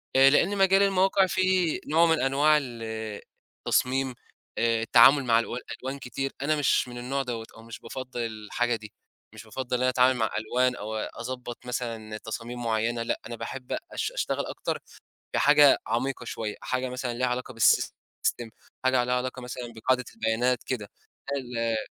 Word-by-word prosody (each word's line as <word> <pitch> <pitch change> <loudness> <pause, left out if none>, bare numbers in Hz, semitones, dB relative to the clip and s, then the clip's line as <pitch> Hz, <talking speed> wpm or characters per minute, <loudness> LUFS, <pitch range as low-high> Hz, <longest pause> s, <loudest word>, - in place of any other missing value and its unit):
آآ 135 +1 +8
لإن 185 +8 +3
مجال 195 0 +5
المواقع 195 0 +3
فيه 185 -3 +1
نوع 165 +3 +4
من 160 -1 +3
أنواع 145 +3 +4
ال 120 -4 -7 0.8
التصميم، 130 +1 +1 0.4
آآ، 115 -1 +2
التعامل 125 +5 +6
مع 115 -2 +4
ألوا 120 +1 -3 0.2
ألوان 135 +2 -4
كتير 135 +2 -4
أنا 150 +2 +2
مش 145 -3 +2
من 120 0 -8
النوع 135 +3 -2
دوّة، 115 -3 -4
أو 115 - -13
مش 115 -1 -9
بافضّل 130 +1 -7
الحاجة 115 +1 -1
دي، 105 -2 -10 0.4
مش 110 0 -10
بافضّل 125 +3 -4
إن 125 - -4
أنا 130 - +4
أتعامل 130 0 +4
مع 110 -2 +1
ألوان 125 +3 +1
أو 110 -1 -5
أضبّط 120 +2 -6
مثلًا 115 -3 -4
تصاميم 115 +3 -6
معيّنة، 115 +1 0
لأ، - - -2
أنا 120 - -6
باحب 125 +3 -5
أش - - -2
أشتغل - - -2
أكتر - - -3 0.5
في - - +1
حاجة 145 -1 +6
عميقة 125 +3 -1
شويّة، 110 -3 -4
حاجة 130 0 -1
مثلًا 125 -1 -3
ليها 125 +2 0
علاقة 125 +1 -3
بالSystem 115 +1 +1 0.4
حاجة 130 -1 +3
ليها 125 +1 0
علاقة 130 0 -3
مثلًا 125 -1 -6
بقاعدة 125 +3 +1
البيانات 120 - +1
كده، 110 -6 -3 0.4
لا 140 - 0
ال 115 -3 -2
125 Hz, 170 wpm, -27 LUFS, 115-135 Hz, 0.8 s, آآ